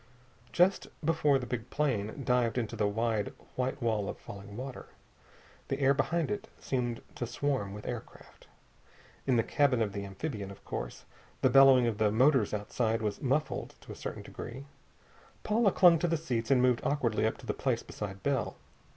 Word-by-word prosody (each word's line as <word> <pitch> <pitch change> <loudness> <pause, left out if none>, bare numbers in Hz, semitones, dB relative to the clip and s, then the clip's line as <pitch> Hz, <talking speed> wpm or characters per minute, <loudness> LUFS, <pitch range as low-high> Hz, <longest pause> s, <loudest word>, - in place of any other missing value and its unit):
Just 180 +9 +3 0.2
before 150 -3 +3
the 130 - -4
big 125 -1 -4
plane 135 -3 -1
dived 125 -2 +2
into 115 -1 -2
the 105 -2 +1
wide 110 0 -1 0.2
white 130 +2 -1
wall 110 -4 0
of - - -5
falling 100 +1 -10
water, 130 +1 -7 0.8
the 135 - -2
air 135 0 +5
behind 160 +3 0
it 205 -1 -3
seemed 120 -3 -2
to 120 - -4
swarm 130 -4 -1
with 105 +1 -8
aircraft. 120 -2 -8 0.8
In 130 - +4
the 115 - +3
cabin 140 -2 +2
of 105 -3 0
the 100 - -4
amphibian, 100 +1 -5
of 100 - -12
course, - - -5 0.4
the - - +5
bellowing 135 -2 +7
of 115 -3 -1
the 110 -1 +4
motors 130 0 +4
outside 110 +2 -1
was 105 -2 -2
muffled 140 +4 -1
to - - -11
a - - -7
certain - - -6
degree. 130 +4 -8 0.8
Paula 215 -1 +3
clung 175 -3 +6
to 175 - +1
the 165 0 +1
seats 125 -7 -2
and 130 -2 +4
moved 125 -2 +3
awkwardly 120 -6 +1
up 110 - -2
to - - -13
the - - -1
place - - -1
beside 95 -2 -7
Bell. 135 -5 0
125 Hz, 180 wpm, -31 LUFS, 110-140 Hz, 0.8 s, bellowing